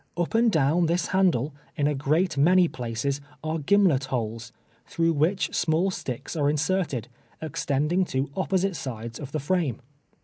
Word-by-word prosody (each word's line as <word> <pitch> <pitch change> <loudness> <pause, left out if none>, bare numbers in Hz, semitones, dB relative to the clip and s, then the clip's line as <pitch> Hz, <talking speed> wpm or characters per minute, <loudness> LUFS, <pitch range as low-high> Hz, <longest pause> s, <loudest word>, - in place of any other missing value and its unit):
Up 175 -1 -1
and 230 0 +4
down 160 +1 +2
this 170 +2 0
handle, 170 -8 +2 0.2
in 145 - 0
a 150 - +2
great 155 +6 +1
many 175 +5 +5
places, 130 +2 -3 0.2
are 160 +1 -2
gimlet 165 -4 +3
holes, 115 -4 -4 0.4
through 165 0 +1
which 160 +6 +1
small 170 +4 +1
sticks 130 -3 -5
are 145 -2 +2
inserted, 150 - 0 0.3
extending 150 +3 0
to 135 -2 -2
opposite 190 0 0
sides 115 -5 -6
of 140 -2 -7
the 155 - -2
frame. 150 -5 0
155 Hz, 150 wpm, -26 LUFS, 135-180 Hz, 0.4 s, many